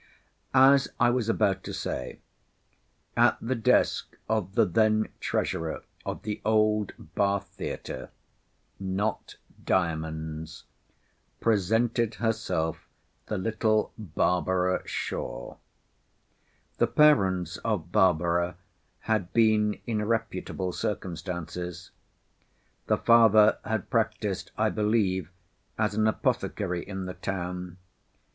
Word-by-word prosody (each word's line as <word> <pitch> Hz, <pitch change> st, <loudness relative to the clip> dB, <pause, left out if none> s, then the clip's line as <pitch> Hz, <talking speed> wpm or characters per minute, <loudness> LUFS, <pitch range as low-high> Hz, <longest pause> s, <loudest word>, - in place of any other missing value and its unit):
As 135 Hz, +1 st, +6 dB
I 120 Hz, -, +5 dB
was 120 Hz, -3 st, 0 dB
about 100 Hz, -4 st, +1 dB
to -, -, -5 dB
say—at -, -, -3 dB
the 120 Hz, +3 st, -1 dB
desk 115 Hz, -3 st, +2 dB
of 105 Hz, -3 st, -1 dB
the 115 Hz, -2 st, +5 dB
then 110 Hz, +3 st, +2 dB
treasurer 80 Hz, -1 st, -2 dB, 0.2 s
of -, -, -4 dB
the 105 Hz, -1 st, -4 dB
old 105 Hz, -1 st, +2 dB, 0.2 s
Bath 100 Hz, 0 st, 0 dB
theatre—not 95 Hz, +9 st, -6 dB, 0.3 s
Diamond's—presented 85 Hz, +8 st, -2 dB
herself 95 Hz, -8 st, -1 dB, 0.4 s
the 105 Hz, -, -2 dB
little 110 Hz, +2 st, +1 dB
Barbara 90 Hz, -1 st, 0 dB
S——. -, -, -3 dB, 1.7 s
The -, -, +4 dB
parents 95 Hz, -, +3 dB
of 100 Hz, -7 st, -2 dB
Barbara 85 Hz, -3 st, +2 dB, 0.4 s
had 110 Hz, -5 st, -1 dB
been 110 Hz, -2 st, +3 dB
in 110 Hz, -3 st, -1 dB
reputable 105 Hz, -4 st, -2 dB
circumstances. 90 Hz, -2 st, -4 dB, 1.0 s
The -, -, +3 dB
father 110 Hz, -2 st, +6 dB
had 110 Hz, -3 st, -3 dB
practised, -, -, -1 dB
I -, -, +2 dB
believe, 100 Hz, -5 st, +1 dB, 0.5 s
as 110 Hz, -1 st, +1 dB
an 110 Hz, +1 st, +2 dB
apothecary 90 Hz, -4 st, -1 dB
in 95 Hz, -1 st, -5 dB
the 90 Hz, -, -5 dB
town. 90 Hz, -2 st, -5 dB
100 Hz, 95 wpm, -27 LUFS, 90-110 Hz, 1.7 s, As